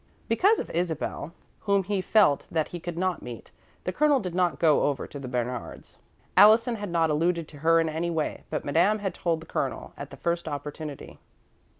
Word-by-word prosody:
Because 395 - +4
of - - -5
Isabel, 165 -2 -2 0.3
whom 200 -2 +1
he 200 0 -1
felt 185 -7 +3
that 160 -2 -1
he 175 - -6
could 175 0 -6
not 185 0 -1
meet, 120 -2 -9 0.3
the 185 - -2
Colonel 295 +3 +3
did 180 -6 -5
not 180 -1 +1
go 155 -3 +4
over 140 -3 -1
to 140 - -9
Bernard's. 125 -2 -5 0.4
Allison 225 +3 +6
had 205 -2 -5
not 165 -2 +2
alluded 165 +1 0
to 145 - -13
her 165 +2 +4
in 165 - +1
any 160 +2 -2
way, 160 -3 -2
but 155 - -3
Madame 175 +9 +3
had 195 -4 -3
told 170 -3 -1
the - - -11
Colonel - - -3
at - - -8
the - - -11
first 170 -1 -2
opportunity. 150 0 -6
170 Hz, 195 wpm, -27 LUFS, 155-185 Hz, 0.4 s, Allison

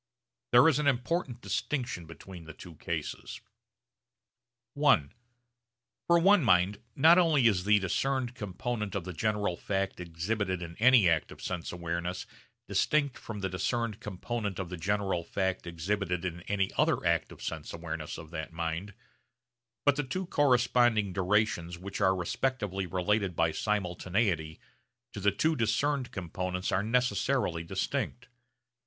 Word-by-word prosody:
There 120 +5 +7
is 150 -3 +3
an 150 - +1
important 130 -1 0
distinction 125 - -2
between 85 +1 -11
the 80 -1 -10
two 90 - -11
cases. - - -5 1.4
(i) 140 - +4 1.0
For 170 - +6
one 190 +1 +5
mind 95 -1 +3
not 165 +5 +7
only 155 -7 +4
is 95 -5 +3
the 105 0 +5
discerned 125 +6 0
component 105 -1 -4
of 100 - -2
the 90 +1 -6
general 105 -1 0
fact 95 +1 -2
exhibited 90 +2 -2
in 85 0 -8
any 120 -4 +6
act 85 -3 +1
of - - -11
sense 90 -2 -4
awareness 85 +1 -3 0.4
distinct 145 -4 +1
from 105 -3 -7
the 95 - 0
discerned 110 +4 -1
component 105 0 -4
of 95 -3 -4
the 90 - -5
general 95 0 -1
fact 95 +1 -2
exhibited 90 +1 -2
in 90 -1 -4
any 95 -1 0
other - - +2
act - - +1
of - - -11
sense - - -5
awareness - - -5
of 80 -1 -10
that 80 -1 -5
mind, 85 +4 -4 0.9
but 145 0 +4
the 145 - +1
two 185 +8 -3
corresponding 120 - +3
durations 95 -3 +1
which 95 +3 -6
are 95 -1 +4
respectively 95 0 -2
related 95 +1 0
by 80 0 +2
simultaneity 90 -4 -1 0.5
to - - -5
the 100 +1 +3
two 155 +11 +1
discerned 125 +4 0
components 90 0 -3
are 95 - +2
necessarily 125 -5 +1
distinct. 120 +8 -3
100 Hz, 145 wpm, -30 LUFS, 90-120 Hz, 1.4 s, There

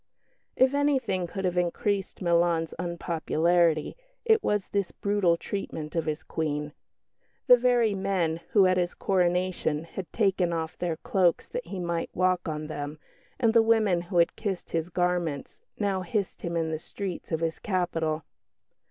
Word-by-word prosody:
If 260 +1 +4
anything 265 -11 +1
could 190 +2 -4
have 180 0 +1
increased 190 +3 -1
Milan's 170 -1 +2
unpopularity 170 -1 +1 0.3
it 445 -1 +4
was 210 -2 0
this 200 -3 0
brutal 200 -4 +1
treatment 160 -5 -5
of 165 -1 -1
his 155 0 -2
Queen. 150 -2 -3 0.7
The 250 - +9
very 240 -3 +3
men 190 -4 0
who, 200 -3 +6
at 185 0 +3
his 175 -1 0
coronation, 180 -4 0
had 170 0 -8
taken 190 -5 +1
off 160 0 -3
their 170 -3 -2
cloaks 180 0 +1
that - - -5
he 195 - -5
might 170 -1 -2
walk 185 -1 +1
on 155 -1 -3
them, 150 -1 -5 0.4
and 230 -3 +3
the 230 - +7
women 220 -6 +3
who 175 +1 -4
had 170 -1 +4
kissed 200 -5 -4
his 165 +1 -1
garments, 175 -5 -1 0.2
now 200 -3 0
hissed 195 +1 -2
him 170 -1 -2
in 160 -1 -1
the 155 - -2
streets 190 +2 -6
of 160 0 -1
his 165 0 -1
capital. 165 -5 -1
175 Hz, 160 wpm, -27 LUFS, 165-195 Hz, 0.7 s, The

